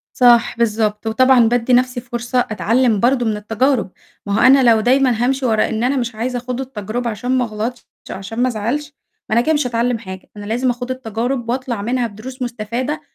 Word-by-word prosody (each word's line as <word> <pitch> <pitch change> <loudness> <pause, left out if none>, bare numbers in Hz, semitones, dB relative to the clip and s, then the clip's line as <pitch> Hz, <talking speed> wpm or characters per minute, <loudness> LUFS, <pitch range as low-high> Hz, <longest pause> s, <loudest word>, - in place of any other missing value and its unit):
صح 240 -2 +4
بالضبط. 215 -1 0
وطبعًا 245 +1 +4
بادّي 245 +1 +1
نَفْسي 250 0 +2
فرصة 240 +1 -2
أتعلّم 220 +3 +1
برضه 245 +1 +2
من 215 -1 0
التجارب، 225 +1 0 0.4
ما 200 - -2
هو - - +2
أنا 265 +1 +6
لو 225 -1 +4
دايمًا 250 -1 +2
هامشي 265 +1 0
ورا 220 -2 +2
إن 225 +1 -2
أنا 270 +3 +1
مش 240 -2 -2
عايزة 245 +3 -2
أخوض 250 +1 -4
التجربة 235 -1 -4
عشان 230 +4 -5
ما 250 - +1
أغلطش 225 +3 -5 0.2
عشان 195 +5 -6
ما 255 - +3
أزعلش، 255 +6 -3 0.4
ما - - 0
أنا - - +5
كده 310 +7 +1
مش 295 -3 0
هاتعلّم 235 0 0
حاجة. 190 -4 -10
أنا 205 - -8
لازم 245 +4 0
أخوض 245 +1 -5
التجارب 245 0 -3
وأطلع 245 -3 -2
منها 245 +3 0
بدروس 250 +5 -9
مستفادة، 240 +5 -3
240 Hz, 195 wpm, -18 LUFS, 220-255 Hz, 0.4 s, أنا